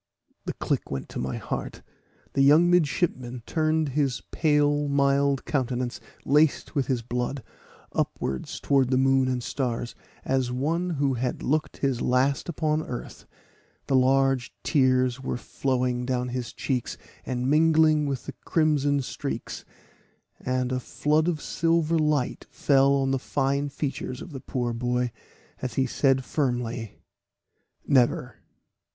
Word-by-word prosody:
The - - -3
click - - -2
went 70 -1 -5
to - - -5
my 65 0 -3
heart. - - -5 0.5
The 135 - +2
young 155 +6 +6
midship 175 -1 +2
man 125 -1 -8
turned 155 -1 +1
his 135 -2 -1
pale 145 -1 +2
mild 140 0 +2
countenance, 125 -3 -1 0.3
laced 150 +1 +2
with 140 -3 0
his 125 -4 -1
blood, 125 +2 -3 0.5
upwards 65 -1 -2
towards 135 -3 +2
the 130 - +2
moon 135 0 +3
and 125 -1 -1
stars, 120 -3 -2 0.3
as 130 -2 0
one 160 +8 -1
who 140 -1 +1
had 125 +1 -2
looked 155 +2 0
his 135 -3 0
last 130 +2 +1
look 165 -1 -6
on 155 0 +2
earth; 125 -5 -7 0.6
the 135 - +1
large 135 0 +3
tears 130 -3 +2
were 130 - -3
flowing 125 -1 -1
down 125 -1 -1
his 125 -1 -4
cheeks, 125 -4 -3 0.3
and 125 0 -2
mingling 155 0 +4
with 135 -3 -3
the - - -6
crimson 145 -3 +2
streaks, - - -5 0.7
and 130 0 -1
a 130 - 0
flood 150 +5 +1
of 170 -3 0
silver 165 0 +1
light 150 -4 0
fell 140 -1 +3
on 135 -1 +1
the 135 - +1
fine 140 +2 0
features 135 -3 -4
of 175 - -9
the 135 -3 -7
poor 120 -3 -2
boy, 125 +1 -1 0.5
as 125 -3 -4
he 135 - +2
said 130 0 +1
firmly, 120 -6 -2 0.9
"Never." 125 -2 +2
135 Hz, 145 wpm, -26 LUFS, 125-145 Hz, 0.9 s, young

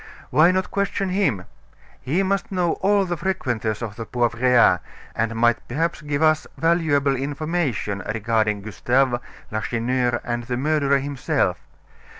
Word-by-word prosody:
"Why 155 +6 +6
not 185 0 0
question 200 -1 -1
him? 180 - 0 0.6
He 160 +9 0
must 195 +1 -1
know 180 -3 +1
all 200 0 +3
the 175 -1 -2
frequenters 120 - -2
of 105 -2 -6
the 115 - -5
Poivriere, 120 -4 +3 0.4
and 115 0 -1
might 120 +1 +2
perhaps 160 +7 -1
give 150 0 -1
us 155 0 +3
valuable 160 -5 +2
information 140 - -2
regarding 110 -2 0
Gustave, 120 +5 +1 0.3
Lacheneur, 120 +3 0
and 120 0 -3
the 125 0 -2
murderer 140 0 +2
himself. 140 -1 -1
135 Hz, 135 wpm, -22 LUFS, 115-165 Hz, 0.6 s, Why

